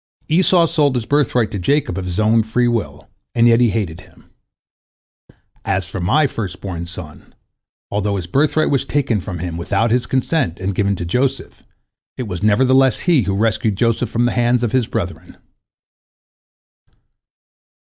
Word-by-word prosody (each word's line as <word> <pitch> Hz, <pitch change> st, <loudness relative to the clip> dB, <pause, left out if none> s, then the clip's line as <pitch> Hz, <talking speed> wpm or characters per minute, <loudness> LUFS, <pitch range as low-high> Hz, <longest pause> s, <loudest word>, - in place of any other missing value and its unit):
Esau 175 Hz, +1 st, +4 dB
sold 150 Hz, -5 st, +1 dB
his 120 Hz, -3 st, -2 dB
birthright 125 Hz, -6 st, +1 dB
to 100 Hz, -, -4 dB
Jacob 140 Hz, -, 0 dB
of 95 Hz, -, -4 dB
his 90 Hz, +2 st, -3 dB
own 110 Hz, +1 st, +3 dB
free 115 Hz, +3 st, 0 dB
will, 120 Hz, -2 st, -3 dB, 0.3 s
and 115 Hz, -1 st, +4 dB
yet 115 Hz, 0 st, +5 dB
he 120 Hz, -1 st, +4 dB
hated 100 Hz, -7 st, -3 dB
him. -, -, -22 dB, 1.3 s
As 95 Hz, -2 st, -1 dB
for 95 Hz, +2 st, -6 dB
my 135 Hz, -, +2 dB
first 100 Hz, -9 st, -4 dB
born 85 Hz, -3 st, -6 dB
son, 85 Hz, -4 st, -10 dB, 0.6 s
although 105 Hz, 0 st, -1 dB
his 95 Hz, -3 st, -4 dB
birthright 150 Hz, -, +1 dB
was 140 Hz, -, +1 dB
taken 125 Hz, -8 st, -1 dB
from 90 Hz, -1 st, -6 dB
him 85 Hz, 0 st, -5 dB
without 100 Hz, +6 st, 0 dB
his 120 Hz, 0 st, +1 dB
consent, 130 Hz, -, -1 dB
and 95 Hz, +1 st, -2 dB
given 100 Hz, +1 st, 0 dB
to 85 Hz, -, -5 dB
Joseph, 125 Hz, +10 st, -2 dB, 0.6 s
it 130 Hz, -, -3 dB
was 90 Hz, -3 st, -5 dB
nevertheless 130 Hz, +4 st, +3 dB
he 170 Hz, -7 st, +3 dB
who 100 Hz, -2 st, -1 dB
rescued 110 Hz, 0 st, 0 dB
Joseph 115 Hz, +2 st, 0 dB
from 120 Hz, +1 st, 0 dB
the 120 Hz, -, +1 dB
hands 120 Hz, 0 st, +1 dB
of 115 Hz, -, 0 dB
his 125 Hz, -3 st, +1 dB
brethren." -, -, -5 dB
115 Hz, 165 wpm, -18 LUFS, 95-130 Hz, 1.3 s, yet